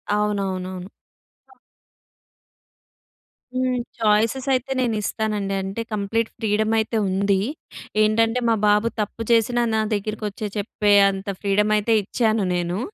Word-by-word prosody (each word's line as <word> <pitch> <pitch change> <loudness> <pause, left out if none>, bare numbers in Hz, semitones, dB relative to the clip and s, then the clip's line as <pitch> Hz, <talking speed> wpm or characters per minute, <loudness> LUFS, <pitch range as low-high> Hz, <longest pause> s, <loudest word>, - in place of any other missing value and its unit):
అవునవునవును. 190 -3 -2 2.6
హ్మ్. 255 0 0 0.2
ఛాయిసెస్ 225 +5 +2
అయితే 255 +1 -1
నేనిస్తానండి. 215 -3 -1
అంటే 195 +4 -4
కంప్లీట్ 215 +2 -1
ఫ్రీడమ్ 215 0 0
అయితే 220 +1 -1
ఉంది. 195 +1 +1 0.6
ఏంటంటే 225 +3 +2
మా 225 - +4
బాబు 210 +2 +3
తప్పు 210 +2 -4
చేసినా 235 +1 +3
నా 220 - +2
దగ్గరికి 215 +1 -3
వచ్చి 210 +1 -5
చెప్పే 205 0 +1 0.2
అంత 195 +1 -7
ఫ్రీడమ్ 210 +1 +2
అయితే 220 +2 +2
ఇచ్చాను 220 0 0
నేను. 175 +2 -2
210 Hz, 110 wpm, -22 LUFS, 200-225 Hz, 2.6 s, మా